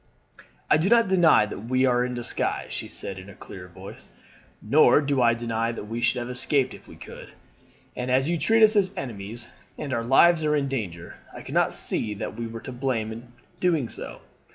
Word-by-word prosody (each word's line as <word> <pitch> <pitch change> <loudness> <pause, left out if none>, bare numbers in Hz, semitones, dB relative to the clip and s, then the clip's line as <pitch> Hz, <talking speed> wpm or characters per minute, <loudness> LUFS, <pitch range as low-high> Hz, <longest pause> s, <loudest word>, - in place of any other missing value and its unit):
"'I - - +7
do 165 +5 0
not 235 -1 +5
deny 175 - +5
that 105 0 -8
we 130 +2 +2
were 125 -1 +2
in 125 0 -3
disguise,' 120 -1 -1
she - - -5
said 95 -1 -6
in 95 - -12
her 100 - -12
clear 90 -2 -11
voice. 95 +2 -12 0.5
'Nor 125 - +5
do 140 -2 0
I 120 -1 +4
deny 115 0 -2
that 115 - -7
we 115 +3 -5
should 125 - +2
have 120 0 -4
escaped 130 +1 0
if - - -14
we - - -13
could. - - -12 0.6
And 125 +1 -4
as 130 +2 +2
you 170 0 -1
treat 225 +4 +3
us 215 0 +5
as 195 -1 +1
enemies, 115 - -6 0.3
and 140 -3 -4
our 115 - 0
lives 160 +7 +5
are 150 0 +2
in 140 -2 0
danger, 100 -11 -5 0.2
I - - -9
cannot - - +1
see 105 -1 -2
that - - -5
we 115 0 -5
were 115 0 -8
to 130 - -8
blame 120 -4 -2
in 120 +2 -10 0.3
doing 160 -9 +1
so. - - -8
125 Hz, 210 wpm, -25 LUFS, 115-145 Hz, 0.6 s, I